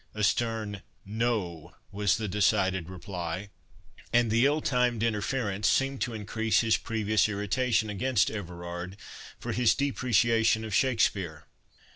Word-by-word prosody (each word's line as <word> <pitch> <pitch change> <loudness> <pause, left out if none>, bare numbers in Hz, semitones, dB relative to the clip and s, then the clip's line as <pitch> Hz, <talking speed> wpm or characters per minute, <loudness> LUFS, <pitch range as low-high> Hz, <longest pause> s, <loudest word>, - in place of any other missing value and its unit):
A 105 - -2
stern 110 -2 0 0.2
No, 100 -7 -2 0.2
was 100 -1 +1
the 110 -1 -3
decided 95 -3 +1
reply; 90 +1 -5 0.6
and 120 -2 +3
the 115 +4 +4
ill 150 +2 +1
timed 125 -5 +1
interference 105 -2 0
seemed 135 0 +1
to 120 - -2
increase 110 +1 0
his 115 -2 +3
previous 110 -1 +1
irritation 110 +3 0
against 105 +2 +1
Everard 90 -1 -6 0.4
for - - -5
his 115 -2 +3
depreciation 115 -4 +2
of 110 - -6
Shakspeare. 100 - +1
110 Hz, 125 wpm, -28 LUFS, 95-115 Hz, 0.6 s, the